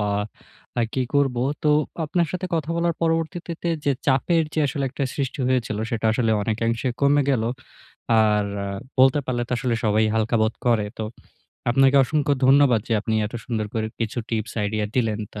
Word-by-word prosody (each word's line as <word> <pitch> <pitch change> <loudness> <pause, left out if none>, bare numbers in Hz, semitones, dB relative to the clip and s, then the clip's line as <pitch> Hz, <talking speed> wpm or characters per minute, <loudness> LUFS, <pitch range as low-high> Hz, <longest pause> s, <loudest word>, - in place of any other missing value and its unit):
বা 105 0 0 0.7
আ - - +3
কি 130 - 0
করবো। 135 -4 +2 0.2
তো 150 - +3 0.3
আপনার 170 +2 +1
সাথে 185 0 -3
কথা 160 -1 -2
বলার 170 0 +1
পরবর্তীতে 165 +1 -1
তে 170 - -1 0.4
চাপের 150 +5 +3
যে - - -1
আসলে 140 0 -2
একটা 140 - -2
সৃষ্টি 140 0 -3
হয়েছিল 120 -4 0
সেটা 115 -2 -1
আসলে 115 -1 +1
অনেকাংশে 115 +3 -1
কমে 145 +1 +4
গেলো। 115 -4 +1 0.7
আর 105 -1 +3 0.5
বলতে 130 +2 +6
পারলে 120 -1 -1
তো - - -4
আসলে 120 -2 0
সবাই 110 0 +3
হালকা 115 +1 +1
বোধ 110 +1 +1
করে। 115 -4 +3
তো 110 - -2 0.7
আপনাকে 135 +2 +4
অসংখ্য 145 +1 0
ধন্যবাদ 135 -4 +5
যে - - 0
আপনি 110 +1 -2
এত 110 - -10
সুন্দর 110 -3 -2
করে 110 -1 -1
কিছু 115 +1 -2
টিপস 110 -1 -2
আইডিয়া 105 0 -1
দিলেন। 110 -3 +1
তো 105 - -6
125 Hz, 175 wpm, -23 LUFS, 110-145 Hz, 0.7 s, বলতে